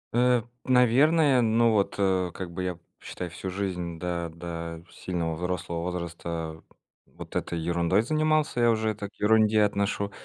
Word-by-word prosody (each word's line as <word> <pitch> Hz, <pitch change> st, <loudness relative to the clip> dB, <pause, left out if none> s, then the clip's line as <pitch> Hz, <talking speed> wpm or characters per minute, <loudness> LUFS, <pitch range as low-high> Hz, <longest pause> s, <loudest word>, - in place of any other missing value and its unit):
Э, 125 Hz, -1 st, +3 dB, 0.2 s
наверное, 130 Hz, +3 st, +4 dB
ну, 115 Hz, +1 st, +3 dB
вот, 100 Hz, -2 st, +1 dB
э, 95 Hz, -2 st, +1 dB
как 90 Hz, -2 st, -6 dB
бы 90 Hz, +2 st, -4 dB
я, 90 Hz, -2 st, -3 dB, 0.2 s
считай, 90 Hz, -1 st, -6 dB
всю 95 Hz, +3 st, -6 dB
жизнь 90 Hz, -3 st, -3 dB
да 85 Hz, 0 st, -3 dB
да 85 Hz, 0 st, -6 dB
сильного 85 Hz, -3 st, -3 dB
взрослого 85 Hz, -1 st, -3 dB
возраста 85 Hz, -2 st, -5 dB, 0.5 s
вот -, -, -11 dB
этой 85 Hz, -, -2 dB
ерундой 85 Hz, +5 st, +1 dB
занимался, 155 Hz, -1 st, +1 dB
я 120 Hz, 0 st, +4 dB
уже 110 Hz, -1 st, +1 dB
это 100 Hz, -1 st, -6 dB
к -, -, -37 dB
ерунде 110 Hz, 0 st, +4 dB
отношу. 100 Hz, 0 st, 0 dB
95 Hz, 150 wpm, -27 LUFS, 85-115 Hz, 0.5 s, наверное